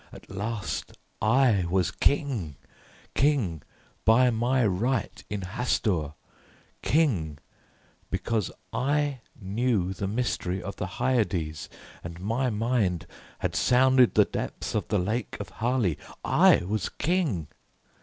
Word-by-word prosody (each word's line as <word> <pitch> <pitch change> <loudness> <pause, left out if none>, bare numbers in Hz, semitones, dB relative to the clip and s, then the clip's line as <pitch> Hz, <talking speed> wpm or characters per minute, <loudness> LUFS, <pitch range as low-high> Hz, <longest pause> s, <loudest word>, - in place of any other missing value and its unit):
At - - -13
last 100 +2 -4 0.2
I 110 -4 +4
was 95 +1 +1
King, 110 - 0 0.6
King 125 - +1 0.4
by 125 +3 +5
my 120 +2 +2
right 110 +7 -1
in 105 -1 -3
Hastur, 90 -6 -1 0.7
King 100 - +1 0.7
because 110 -4 -1 0.2
I 140 +2 0 0.2
knew 100 -2 0
the 95 +1 -3
mystery 105 -4 -1
of 100 +2 -7
the - - -3
Hyades, 100 -12 0 0.3
and 85 0 -7
my 115 +7 0
mind 110 -5 0 0.4
had - - -1
sounded 130 0 +4
the - - +6
depths - - -4
of 105 -5 -1
the 105 - +1
Lake 105 +5 -2
of - - -6
Hali. 115 - +1 0.3
I - - +5
was 100 -1 -1
King! 150 - 0
110 Hz, 115 wpm, -27 LUFS, 95-125 Hz, 0.7 s, the